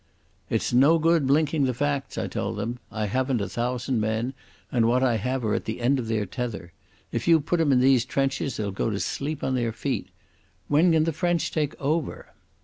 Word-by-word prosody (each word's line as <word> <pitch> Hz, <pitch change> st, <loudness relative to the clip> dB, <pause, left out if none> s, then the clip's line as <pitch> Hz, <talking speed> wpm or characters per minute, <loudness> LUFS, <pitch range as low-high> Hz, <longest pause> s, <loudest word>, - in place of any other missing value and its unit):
"It's -, -, -1 dB
no 140 Hz, +7 st, +6 dB
good 165 Hz, -3 st, +2 dB
blinking 150 Hz, +1 st, +2 dB
the 125 Hz, -2 st, -1 dB
facts," 145 Hz, +1 st, -2 dB
I -, -, -1 dB
told -, -, -3 dB
them. 115 Hz, +4 st, -3 dB
"I 110 Hz, -1 st, -2 dB
haven't 130 Hz, +4 st, 0 dB
a 100 Hz, -, -2 dB
thousand 125 Hz, +1 st, -1 dB
men, 110 Hz, +4 st, -1 dB, 0.4 s
and 115 Hz, -3 st, +3 dB
what 125 Hz, +2 st, +2 dB
I 120 Hz, -3 st, +3 dB
have 125 Hz, +3 st, -2 dB
are 105 Hz, -, +1 dB
at -, -, -2 dB
the 110 Hz, +2 st, -4 dB
end 130 Hz, +3 st, +2 dB
of 115 Hz, -, -4 dB
their 110 Hz, -2 st, 0 dB
tether. 105 Hz, -5 st, -5 dB, 0.4 s
If -, -, -3 dB
you 165 Hz, -1 st, +6 dB
put 165 Hz, +4 st, -1 dB
'em 150 Hz, -3 st, +3 dB
in 125 Hz, -2 st, +4 dB
these 130 Hz, -2 st, +5 dB
trenches 135 Hz, 0 st, -1 dB
they'll 105 Hz, -2 st, -2 dB
go 100 Hz, -, -1 dB
to 100 Hz, -2 st, -2 dB
sleep 145 Hz, +6 st, -3 dB
on 130 Hz, -, 0 dB
their 120 Hz, -3 st, 0 dB
feet. 110 Hz, -, -3 dB, 0.6 s
When 160 Hz, +5 st, +4 dB
can 160 Hz, -1 st, +4 dB
the 165 Hz, 0 st, 0 dB
French 175 Hz, +1 st, 0 dB
take 150 Hz, -3 st, -2 dB
over?" 150 Hz, +2 st, -2 dB
130 Hz, 215 wpm, -25 LUFS, 115-145 Hz, 0.6 s, no